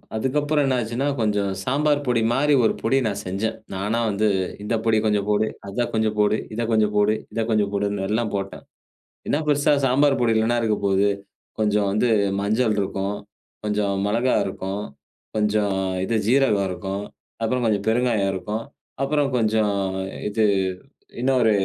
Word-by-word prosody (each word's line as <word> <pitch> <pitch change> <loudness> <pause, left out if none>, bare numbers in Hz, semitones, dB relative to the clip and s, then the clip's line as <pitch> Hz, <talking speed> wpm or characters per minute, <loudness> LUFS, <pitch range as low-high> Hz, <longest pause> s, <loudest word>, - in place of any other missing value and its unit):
அதுக்கப்புறம் 145 +5 +1
என்ன 130 -1 +1
ஆச்சுன்னா, 120 +5 -2
கொஞ்சம் 105 -2 +1
சாம்பார் 145 +2 +1
பொடி 120 -2 +2
மாரி 145 +3 +3
ஒரு - - +3
பொடி 130 +4 +2
நான் 100 -1 -3
செஞ்சேன். 105 +5 -2 0.2
நானா 105 +5 -1
வந்து 105 +1 +1 0.4
"இந்த 115 - -1
பொடி 110 -1 +3
கொஞ்சம் 105 -1 +1
போடு, 105 +1 +2 0.2
அத 120 +4 -1
கொஞ்சம் 110 -1 0
போடு, 105 +1 +3 0.2
இத 120 - -2
கொஞ்சம் 105 -1 +2
போடு, 105 +1 +4 0.2
இத 115 - 0
கொஞ்சம் 105 -2 +1
போடுன்னு 100 -1 -1
எல்லாம் 110 0 -1
போட்டேன்." 100 0 -5 0.7
"என்ன 145 - +2
பெருசா 145 0 +3
சாம்பார் 135 +2 +3
பொடியில 110 -2 +3
என்ன 120 0 +2
இருக்க 110 -2 +1
போகுது? 100 +1 +3 0.5
கொஞ்சம் 105 -1 +2
வந்து 110 +5 +1 0.3
மஞ்சள் 110 +2 +1
இருக்கும், 100 +1 -2 0.5
கொஞ்சம் 105 -1 0
மெளகா 115 +5 +2
இருக்கும், 95 +1 -4 0.5
கொஞ்சம் 105 -2 +1 0.3
இது 115 - -1
ஜீரகம் 120 -6 +3
இருக்கும் 95 +2 -4 0.4
அப்புறம் 125 +2 0
கொஞ்சம் 105 -2 0
பெருங்காயம், 110 -4 +2
இருக்கும் 105 +5 -4 0.4
அப்புறம் 140 0 +1
கொஞ்சம் 110 -3 +2 0.5
இது 105 +2 0 0.8
இன்னொரு 125 -3 +3
110 Hz, 150 wpm, -23 LUFS, 100-120 Hz, 0.8 s, போடு